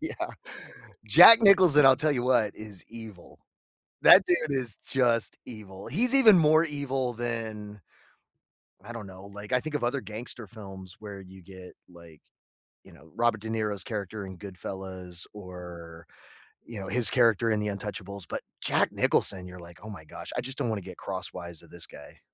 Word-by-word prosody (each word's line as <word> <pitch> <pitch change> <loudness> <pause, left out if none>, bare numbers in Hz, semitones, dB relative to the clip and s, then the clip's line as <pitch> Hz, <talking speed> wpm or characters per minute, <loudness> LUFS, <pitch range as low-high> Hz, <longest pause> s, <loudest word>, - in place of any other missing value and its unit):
Yeah. 320 - -5 0.9
Jack 230 0 +9
Nicholson, 185 -8 +6
I'll 135 -1 +7
tell 150 +2 +1
you 125 -3 -1
what, 120 -5 +2
is 105 -4 -10
evil. 110 -6 -12 0.6
That 190 - +9
dude 175 - +3 0.2
is 120 -5 -5
just 120 -4 0
evil. 100 -5 -10
He's 235 - +2
even 225 -8 +7
more 155 0 +5
evil 135 -4 -3
than 110 -3 -6 1.0
I 120 - -8
don't 110 -4 -8
know. 95 +1 -12
Like, 105 +2 -10
I 125 - +3
think 155 +3 -7
of 145 -5 -1
other 130 +3 -1
gangster 115 +1 -7
films 95 -3 -11
where 100 -2 -9
you 95 0 -14
get, 95 0 -13
like, 85 -3 -16 0.6
you - - -17
know, 80 - -18
Robert 115 -2 +1
De 110 - -7
Niro's 105 -3 -2
character 105 -2 -5
in 95 -1 -10
Goodfellas 95 -2 -7
or, 90 -4 -11 0.6
you 115 -2 -9
know, 95 - -7
his 120 -1 +2
character 115 -2 +3
in 110 - +1
The 105 - -3
Untouchables. 100 -1 -6
But - - -5 0.2
Jack - - +1
Nicholson, 95 -2 0
you're 90 - -11
like, 85 0 -14
"Oh, 110 - -9
my 90 -7 -10
gosh. 75 - -9
I - - 0
just 130 +2 -6
don't - - -1
wanna 110 -2 -2
get 90 -1 -10
crosswise 90 -3 -6
of - - -19
this - - -3
guy." 70 - -15
105 Hz, 175 wpm, -27 LUFS, 95-125 Hz, 1.0 s, Jack